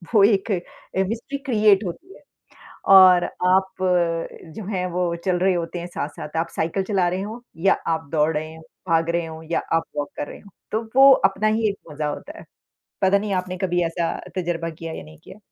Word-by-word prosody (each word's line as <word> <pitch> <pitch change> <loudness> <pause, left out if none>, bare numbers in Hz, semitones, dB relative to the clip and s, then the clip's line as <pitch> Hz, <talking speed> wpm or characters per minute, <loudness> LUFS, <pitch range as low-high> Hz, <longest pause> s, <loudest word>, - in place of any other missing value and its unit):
वो 205 - +7
एक 200 +1 +3
अ, 190 +1 -3
mystery 235 +5 -4
create 215 -5 +4
होती 180 - -7
है। - - -18 0.7
और 185 -2 +8 0.2
आप 190 +1 +3 0.8
जो 220 - -7
हैं, 185 -3 -2
वो 175 -1 -1
चल 185 -2 +2
रहे 190 +1 +3
होते 175 0 -3
हैं 175 - -6
साथ-साथ 150 -1 -6
आप 165 - 0
साइकिल 170 +4 -1
चला 190 -2 +1
रहे 185 +2 -2
हों, 215 +4 -6 0.2
या 195 +4 +4
आप 160 -1 -1
दौड़ 155 0 +2
रहे 155 +1 -5
हों, 160 - -13 0.3
भाग 165 0 +2
रहे 170 0 0
हों 160 0 -9
या - - +2
आप 165 0 +2
वॉक 145 -1 -2
कर 145 - -3
रहे - - -10
हो। 200 - -16 0.2
तो 220 +2 0
वो 270 +1 +9 0.2
अपना 195 +2 -1
ही 220 +1 +2
एक 200 - -5
मज़ा 150 0 -3
होता 305 - -6
है, - - -13 0.6
पता 195 +1 +4
नहीं 205 0 -3
आपने 185 0 -6
कभी 175 -1 +1
ऐसा 165 0 -1 0.3
तजुर्बा 170 -2 -2
किया 165 0 -7
या - - -7
नहीं 75 0 -15
किया। 190 - -12
180 Hz, 210 wpm, -23 LUFS, 165-200 Hz, 0.8 s, वो